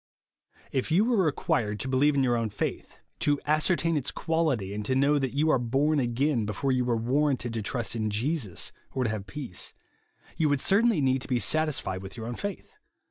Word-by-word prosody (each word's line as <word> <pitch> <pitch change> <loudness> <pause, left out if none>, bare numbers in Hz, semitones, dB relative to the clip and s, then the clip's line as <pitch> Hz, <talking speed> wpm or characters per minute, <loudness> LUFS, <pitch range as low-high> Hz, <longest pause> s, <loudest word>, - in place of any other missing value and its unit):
If 130 +2 -1
you 180 +7 +4
were 230 -5 +3
required 110 -8 0
to - - -3
believe 140 +3 +3
in 135 - +3
your 125 -2 +2
o^vn 115 -2 -1
faith, - - -4 0.2
to 145 -1 +2
ascertain 165 +2 +2
its 145 -4 0
quality, 155 - -1
and 105 +1 -3
to 130 - 0
know 140 +2 +3
that 135 -1 -2
you 155 +2 +3
are 130 - +3
born 140 +6 +1
again, 125 0 +1
before 130 +7 -1
you 130 -1 +2
were 120 -2 +1
warranted 130 0 0
to 115 - -2
trust 120 +2 -2
in 110 -1 -1
Jesus, 110 - -1 0.2
or 130 - 0
to 115 - 0
have 105 -2 -5
peace, 120 -4 -5 0.6
you 155 -2 +2
would 145 -1 +2
certainly 205 - +3
need 130 -1 +2
to - - -7
be 125 - +1
satis 155 +4 +2
fied 95 0 -4
with 95 +3 -9
your 110 - -5
own 120 - -4
faith. 205 - -6
135 Hz, 210 wpm, -28 LUFS, 115-150 Hz, 0.6 s, you